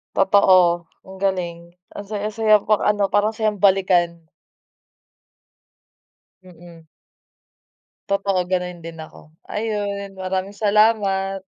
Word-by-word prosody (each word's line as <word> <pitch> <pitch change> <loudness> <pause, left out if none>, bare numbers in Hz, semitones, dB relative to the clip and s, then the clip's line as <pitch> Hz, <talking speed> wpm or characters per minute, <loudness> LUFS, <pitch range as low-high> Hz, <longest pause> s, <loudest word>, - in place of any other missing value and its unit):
Totoo, 185 -3 +4 0.2
ang 190 0 -12
galing 175 -3 -3 0.2
ang 205 -1 -9
saya-saya 215 0 +1
pang 215 -1 +2
ano 205 -2 0
parang 210 +2 +1
sayang 215 -3 -1
balikan. 180 -4 +2 2.2
Mm. 170 -2 -16 1.2
Totoo 200 -1 0
ganun 180 -2 -4
din 165 -1 -8
ako, 155 0 -14 0.2
ayun 205 -2 -4
maraming 190 +1 -4
salamat. 200 -2 +1
195 Hz, 95 wpm, -21 LUFS, 180-205 Hz, 2.2 s, Totoo